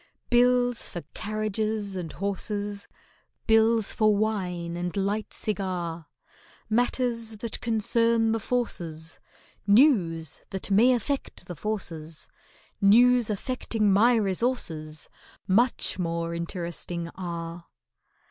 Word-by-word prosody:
Bills 245 0 +3
for 175 - -6
carriages 215 -1 -2
and 175 -4 -4
horses, 200 +1 -3 0.6
Bills 225 -1 +4
for 215 -1 +3
wine 180 -6 -2
and 175 +2 -3
light 205 +2 -1
cigar, 180 -6 -2 0.6
Matters 230 -1 0
that 225 +1 -5
concern 230 0 +2
the 225 - 0
Forces— 170 -10 -3 0.5
News 200 - +3
that 190 +1 -4
may 235 +6 +6
affect 270 +3 -3
the 175 - -7
Forces— 165 -6 -4 0.5
News 240 +3 +5
affecting 215 -1 0
my 235 +5 +5
resources, 190 -7 -1 0.4
Much 230 0 +2
more 170 -1 -2
interesting 170 0 -4
are! 170 -2 -6
205 Hz, 100 wpm, -27 LUFS, 175-230 Hz, 0.6 s, may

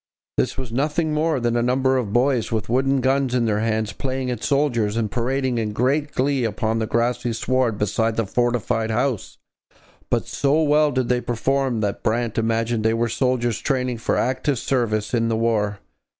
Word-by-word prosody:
This - - 0
was 130 -3 -5
nothing 150 +5 0
more 155 -1 +1
than 120 -1 0
a 120 - +2
number 130 +2 +2
of 120 -6 -1
boys 125 0 +1
with 110 -1 -2
wooden 135 +2 +2
guns 135 -1 +1
in 120 -2 +2
their 105 -2 +1
hands 110 -1 -1
playing 130 +2 -3
at 120 -2 -5
soldiers 120 -7 +1
and 110 -3 -1
parading 130 0 0
in 105 -2 -2
great 140 +6 0
glee 135 0 +1
upon 110 0 -1
the 110 - -1
grassy 120 +1 0
sward 125 -1 0
beside 110 +2 0
the 115 - 0
fortified 120 0 0
house; 120 -1 -1 0.7
but - - 0
so 145 +3 +1
well 150 0 +3
did 130 -2 0
they 125 0 +1
perform 125 0 0
that 100 -2 -2
Brant 115 0 0
imagined 115 0 0
they 110 +1 +2
were 115 0 0
soldiers 120 -1 0
training 125 -4 -1
for - - 0
active 130 +2 0
service 110 -4 -1
in 115 -1 +2
the 110 - 0
war. 105 -3 0
120 Hz, 185 wpm, -22 LUFS, 115-130 Hz, 0.7 s, well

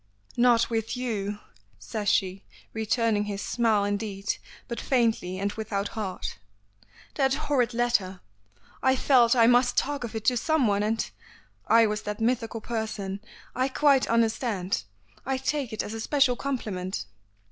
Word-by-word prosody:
"Not 240 -1 +4
with 225 +2 -1
you," 210 -5 -2 0.4
says 115 - -3
she, 190 0 +1 0.3
returning 220 -1 +1
his 200 -1 -4
smile 220 -4 +2
indeed, 205 -1 -2 0.3
but 235 - -4
faintly, 225 -8 +1
and 200 +1 -1
without 205 -2 -3
heart, 195 - -5 0.7
"that 270 -2 +2
horrid 265 -5 0
letter! 230 -6 +1 0.6
I 260 0 +4
felt 250 -3 +4
I 230 -2 +6
must 245 +1 +4
talk 285 -1 0
of 230 -2 -6
it 220 - -4
to 250 - +3
someone, 240 -8 +2
and 220 +2 0 0.3
" - - -31 0.2
"I 230 0 +6
was 210 0 -1
that 210 0 -5
mythical 225 -1 -1
person. 215 -4 -3 0.3
I 255 +1 +1
quite 275 0 +3
understand. 220 - 0 0.4
I 265 +1 -1
take 265 -1 -2
it 220 - -2
as 210 - -6
a 225 - -4
special 270 0 +3
compliment." 205 - -3
225 Hz, 145 wpm, -27 LUFS, 205-250 Hz, 0.7 s, I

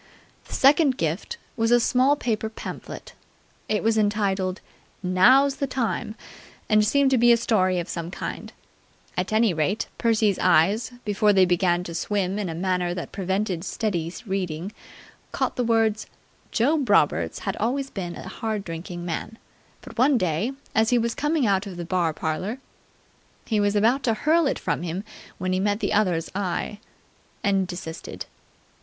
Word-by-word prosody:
The - - -11
second 275 -1 +4
gift 165 - -2 0.2
was 225 -1 +1
a 240 0 +5
small 260 +4 +3
paper 220 -5 -2
pamphlet. 220 - -8 0.6
It 215 - 0
was 225 0 +2
entitled 200 -3 0 0.4
"Now's 255 +10 +5
the 275 - -1
Time!" 235 -4 -2 0.5
and 215 0 +4
seemed 270 +5 +3
to 260 - +3
be 240 +1 +6
a 235 - +6
story 185 -6 +1
of 175 0 -2
some 170 -1 -4
kind. - - -6 0.6
At 180 +3 -2
any 215 -2 +3
rate, 160 +7 -1
Percy's 220 -4 +2
eyes, 205 +9 +3
before 210 0 +3
they 190 -1 +5
began 175 0 +2
to 170 - -7
swim 195 +2 -1
in 200 -4 -2
a 165 - -4
manner 180 0 -1
that 175 - -6
prevented 190 -2 -2
steady 175 -5 -2
reading, 185 -2 -3 0.6
caught - - -1
the 250 - 0
words 225 -2 +1 0.4
"Job 275 +3 +1
Roberts - - +3
had - - -1
always 270 +4 -1
been 175 -3 -5
a - - -8
hard 220 -3 -3
drinking 175 +1 -6
man, 180 +6 -4 0.4
but - - -11
one 265 +1 +5
day, 180 +4 0 0.2
as 220 0 +3
he 245 - +3
was 235 0 0
coming 295 -1 0
out 200 -1 +1
of 185 -3 -8
the 175 - -5
bar 175 -2 +1
parlour.. 160 +9 -3 0.5
." - - -36
He 215 -2 0
was 205 0 +1
about 230 +6 +3
to 225 -3 +2
hurl 315 +6 +3
it - - 0
from - - -2
him, 175 +3 -4 0.3
when 185 0 -2
he 185 - +1
met 205 +1 0
the - - -1
other's 180 -6 +1
eye 200 +1 -3 0.6
and 195 -2 +2
desisted. 175 -3 -7
205 Hz, 170 wpm, -24 LUFS, 180-230 Hz, 0.6 s, be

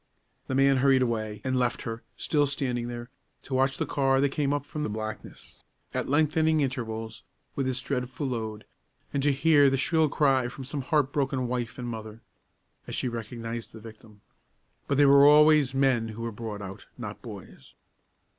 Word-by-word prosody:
The 130 - -2
man 135 0 +4
hurried 130 0 +4
away 110 -3 -2
and 130 0 -1
left 125 -2 0
her, 115 0 -5 0.2
still 145 -2 +1
standing 125 -4 -2
there, 120 0 -7 0.3
to 135 - -8
watch 135 +1 +2
the - - -1
car 135 -1 +1
that 140 +1 +3
came 140 0 -1
up 145 -1 -1
from 150 +1 -6
the 150 - -2
blackness, 110 +1 -7 0.3
at - - -2
lengthening 155 +2 +2
intervals, 115 -4 -4 0.3
with 135 -2 -1
its 130 0 -1
dreadful 130 +1 -3
load, 110 -4 -4 0.5
and 140 - 0
to 145 +1 +3
hear 145 0 +5
the 135 - +1
shrill 160 +3 +2
cry 135 -4 +2
from 125 +2 -8
some 140 +2 -4
heart 145 -1 +1
broken 135 -3 0
wife 120 0 -3
and 125 -2 -5
mother, 110 -1 -7 0.7
as - - -5
she - - -1
recognized 115 0 -6
the 110 - -10
victim. 110 -1 -14 0.7
But 140 - 0
they 145 - +6
were 140 0 +7
always 150 -2 +6
men 130 -4 +2
who 110 +1 -7
were 115 - -3
brought 105 -2 -6
out, 95 0 -9
not - - -7
boys. - - -11
130 Hz, 185 wpm, -27 LUFS, 115-140 Hz, 0.7 s, were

